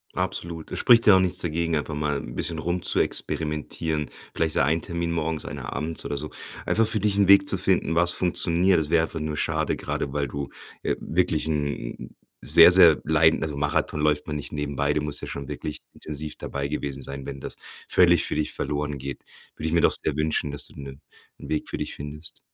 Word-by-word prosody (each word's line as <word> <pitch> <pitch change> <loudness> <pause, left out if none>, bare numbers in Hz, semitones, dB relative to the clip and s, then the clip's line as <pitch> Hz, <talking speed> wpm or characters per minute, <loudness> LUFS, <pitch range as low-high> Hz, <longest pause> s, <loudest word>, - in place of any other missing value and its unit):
Absolut. 85 -2 -1
Es - - -2
spricht 115 -2 +5
ja 105 - +8
auch - - +4
nichts 90 0 +1
dagegen, 85 -1 -1
einfach 75 0 -3
mal 75 -1 -1
'n - - -9
bisschen 80 -2 +1
rumzuexperimentieren, 80 -2 -1 0.2
vielleicht 80 -1 0
so - - +2
ein 80 +4 +2
Termin 85 -1 -3
morgens, 80 -1 -2
einer - - -6
abends 80 +2 -4
oder 70 - -3
so, 75 +2 -6 0.3
einfach 110 0 +2
für 110 - +5
dich 100 0 0
'n 100 -1 +4
Weg 100 0 +7
zu 95 - +3
finden, 90 -3 +1
was 85 +1 +3
funktioniert. 90 0 +2
Das 75 -2 -3
wäre 80 -1 +3
einfach 80 0 -4
nur 75 0 -3
schade. - - 0
Grade 70 - -4
weil 70 -1 -1
du, 70 0 -5 0.3
äh, - - 0
wirklich 80 -2 0
'n 70 -5 -4 0.3
sehr, 85 +1 +8
sehr 85 -4 +6
leiden 80 +1 +3
also, 75 -2 -3
Marathon 75 +1 0
läuft 75 0 +1
man 75 - -3
nicht 70 - -7
nebenbei. 75 0 -1
Du 75 - 0
musst 75 -1 -3
ja - - -6
schon 70 -1 -6
wirklich 75 - -6
intensiv 75 0 -6
dabei 70 0 -4
gewesen 70 -2 -4
sein. 70 0 -8
Wenn 70 -1 -7
das - - -7 0.3
völlig 85 -3 +5
für - - -1
dich 75 - -1
verloren 75 0 -3
geht, 70 -1 -7 0.3
würde 80 - -4
ich 80 - -2
mir 85 - +3
doch - - +4
sehr 75 - +1
wünschen, 75 -1 -1
dass 70 - -4
du - - -15
'nen 70 +1 -9 0.4
'n - - -10
Weg 75 - -2
für - - -4
dich - - -4
findest. 75 +3 -9
75 Hz, 215 wpm, -25 LUFS, 75-85 Hz, 0.4 s, ja